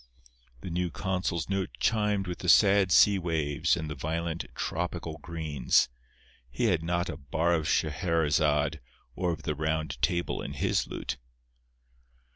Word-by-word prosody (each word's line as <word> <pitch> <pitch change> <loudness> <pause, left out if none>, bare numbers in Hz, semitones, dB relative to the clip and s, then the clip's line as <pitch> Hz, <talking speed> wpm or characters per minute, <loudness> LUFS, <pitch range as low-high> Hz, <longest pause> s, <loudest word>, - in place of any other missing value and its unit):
The 90 - -6
new 90 +1 -1
consul's 90 -2 -2
note 95 -1 -1
chimed 105 -3 +1
with 90 -1 -5
the 90 - -2
sad 100 -1 +6
sea 100 +4 +6
waves 80 -5 0
and 80 - -4
the 75 - -4
violent 80 +3 -3
tropical 85 -1 -3
greens—he 65 - -2
had 90 -8 +2
not 85 +1 -1
a 80 - -5
bar 80 +4 0
of 80 -2 0
Scheherezade 80 -1 +1 0.4
or 90 -1 0
of 80 - -6
the 75 - -1
Round 80 0 -2
Table 85 0 0
in - - -5
his - - 0
lute. - - -4
85 Hz, 140 wpm, -29 LUFS, 80-90 Hz, 0.4 s, sad